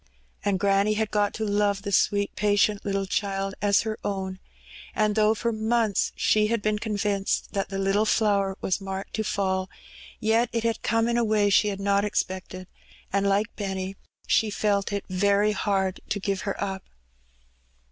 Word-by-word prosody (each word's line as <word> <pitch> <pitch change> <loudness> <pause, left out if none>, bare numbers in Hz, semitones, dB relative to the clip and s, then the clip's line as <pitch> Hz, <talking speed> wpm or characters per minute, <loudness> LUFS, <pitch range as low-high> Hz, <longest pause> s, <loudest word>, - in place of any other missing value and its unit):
And 200 -2 +1
granny 200 +2 +2
had 220 0 -1
got 205 -1 +2
to 220 - -2
love 205 -1 +1
the 200 - -3
sweet, 200 +1 +2
patient 205 0 +2
little 195 -1 -1
child 195 0 -2
as 200 -1 +4
her 220 0 -4
own; 190 -2 -3 0.6
and 215 -1 +2
though 215 +1 +3
for 235 +2 -1
months 220 -2 +1
she 215 0 +3
had 230 +1 0
been 215 0 +1
convinced 205 -2 -1
that 195 -2 -2
the 195 - -4
little 195 +2 +1
flower 200 -3 +2
was 190 +2 -1
marked 195 0 -5
to 220 - 0
fall, 190 -2 -1 0.5
yet 225 +2 +2
it 230 -1 -1
had 230 -1 0
come 230 0 +1
in 235 0 +1
a 240 - +2
way 210 -2 +2
she 210 - +4
had 200 -1 -3
not 200 0 +2
expected, 185 -2 -3 0.5
and, 200 0 +2
like 205 +3 0
Benny, 190 -1 -4 0.3
she 220 - +2
felt 205 -1 0
it 200 -1 -3
very 200 +2 +2
hard 195 -3 0
to 205 - -1
give 195 -1 -2
her - - -4
up. 190 -1 -3
205 Hz, 175 wpm, -26 LUFS, 195-215 Hz, 0.6 s, as